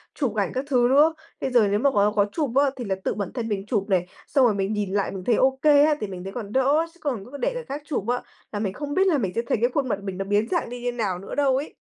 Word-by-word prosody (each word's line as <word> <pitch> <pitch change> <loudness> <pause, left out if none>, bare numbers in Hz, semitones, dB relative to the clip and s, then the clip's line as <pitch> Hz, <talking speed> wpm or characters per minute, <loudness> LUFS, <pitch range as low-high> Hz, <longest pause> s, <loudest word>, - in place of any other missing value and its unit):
chụp 255 -8 -1
ảnh 200 -3 0
các 260 +2 -2
thứ 245 -3 +3
nữa. 295 +5 +5 0.3
Bây 265 - -1
giờ 235 -4 +5
nếu 205 +1 +1
mà 280 +4 +3
có 205 -2 +3
có 205 - +4
chụp 295 -7 -1
á, 280 0 +4
thì 250 -2 -6
là 195 -2 -1
tự - - 0
bản 200 -3 -4
thân 235 -3 -3
mình 200 -3 -2
chụp 210 -3 0
này, 180 -2 +2 0.2
xong 270 -3 +4
rồi 230 - +4
mình 200 +1 -1
nhìn 205 -2 -2
lại 200 -1 0
mình 190 -1 -6
thấy 235 +3 +2
OK 265 +2 +2
á, 300 0 +6
thì 210 - -2
mình 185 -2 -7
thấy 195 +1 -7
còn 215 -5 -6
đỡ 265 +3 +3
á. 325 - +1
Chứ 345 - -24
còn 245 -10 -2
cứ 285 - -7
để - - -1
người - - -5
khác 285 +2 -5
chụp 270 -9 -3
á, 245 +1 0 0.3
là 205 - -3
mình 200 -3 -2
không 290 +5 -5
biết 385 +1 +3
là 325 -6 +3
mình 195 -7 -1
sẽ 230 - +1
thấy - - +1
cái 240 - +3
khuôn 275 -2 0
mặt 205 -3 -1
mình 195 -2 -5
nó 195 - -3
biến 205 +2 +1
dạng 345 -9 0
đi 245 0 -7
như 245 - -1
nào 205 -7 -2
nữa 195 - -7
đâu 275 -2 +3
ấy. 285 +3 -5
240 Hz, 330 wpm, -24 LUFS, 200-280 Hz, 0.3 s, á